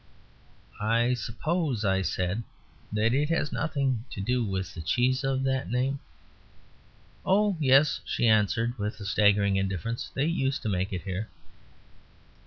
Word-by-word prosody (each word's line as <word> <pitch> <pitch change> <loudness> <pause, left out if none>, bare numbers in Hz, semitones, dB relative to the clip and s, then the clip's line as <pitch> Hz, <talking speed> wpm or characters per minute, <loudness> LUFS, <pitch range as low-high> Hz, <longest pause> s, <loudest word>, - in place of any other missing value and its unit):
"I 115 +3 +2
suppose," 130 - -2
I 95 -1 +2
said, 95 +3 -1 0.5
"that 110 +2 +2
it 145 +3 +1
has 165 -3 0
nothing 135 -7 -1
to - - -7
do 125 +5 0
with 95 -3 -3
the 85 - -7
cheese 125 - +1
of 135 0 0
that 130 -1 -1
name." 130 +3 0 1.2
"Oh, 205 +1 +3
yes," 140 +1 +4
she 120 - 0
answered, 115 +2 +2
with 105 +2 -3
a 100 - -7
staggering 100 -1 +3
indifference, 95 +4 -2
"they 135 - 0
used 140 -4 0
to 110 - -1
make 95 0 -1
it 90 -2 -4
here." 100 +2 -4
115 Hz, 145 wpm, -28 LUFS, 100-135 Hz, 1.2 s, yes